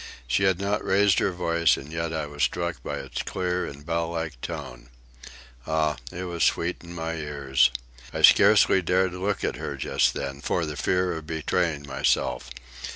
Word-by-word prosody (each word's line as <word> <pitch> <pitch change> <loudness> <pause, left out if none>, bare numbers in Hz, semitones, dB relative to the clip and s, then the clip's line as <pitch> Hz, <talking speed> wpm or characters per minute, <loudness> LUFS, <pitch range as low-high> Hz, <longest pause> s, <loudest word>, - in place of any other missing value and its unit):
She 65 +11 +1
had 95 -2 +2
not 100 +2 -1
raised 100 0 +3
her - - +2
voice, 85 -2 +2
and 75 +4 -9
yet 80 0 -2
I 80 -2 -2
was 75 0 -8
struck 85 +3 0
by - - -4
its - - -5
clear 90 -1 -2
and 70 +1 -10
bell 85 0 -1
like 80 -7 -4
tone. - - -7 0.8
Ah, 80 -1 +1
it 90 - -5
was 85 -2 -2
sweet 85 +2 +1
in 85 0 -10
my 80 0 -3
ears! 70 -4 +2 0.4
I - - -4
scarcely 95 - +7
dared 95 +1 +1
look 95 +2 -2
at - - -1
her - - -5
just - - +1
then, 70 0 -4
for 85 +2 0
the 75 -1 -5
fear 90 +3 +1
of 80 -1 -8
betraying 80 -1 -1
myself. 65 -1 0
80 Hz, 180 wpm, -26 LUFS, 75-90 Hz, 0.8 s, scarcely